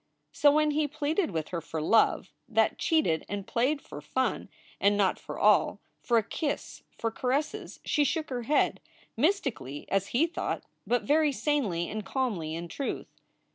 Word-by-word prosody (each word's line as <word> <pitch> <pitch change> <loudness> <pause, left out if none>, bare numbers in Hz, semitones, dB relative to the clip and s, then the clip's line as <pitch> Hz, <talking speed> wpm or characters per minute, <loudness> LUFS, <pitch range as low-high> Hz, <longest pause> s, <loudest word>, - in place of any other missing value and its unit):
So 290 - +5
when 305 +1 +3
he 300 0 +1
pleaded 305 +5 0
with 160 -4 -3
her 170 -2 -3
for 160 0 -5
love 220 +9 +3 0.2
that - - +2
cheated 310 - +2
and 200 -1 -4
played 265 +7 0
for - - -9
fun - - -1 0.3
and 200 +1 +3
not 195 -2 +2
for - - -7
all, - - +4 0.2
for 235 - +2
a 225 - +3
kiss, 290 +7 -3 0.2
for 230 - -1
caresses, 265 +6 -2
she 295 - +2
shook 310 +1 -1
her 245 -1 -2
head 285 +6 +2 0.4
mystically 250 - -1
as 195 0 +1
he 270 +7 +2
thought, 335 - -3 0.2
but 245 0 +2
very 300 +1 +3
sanely 245 - 0
and 215 0 -4
calmly, 190 - -2
in 170 +1 -5
truth. 275 - -5
250 Hz, 170 wpm, -29 LUFS, 195-300 Hz, 0.4 s, So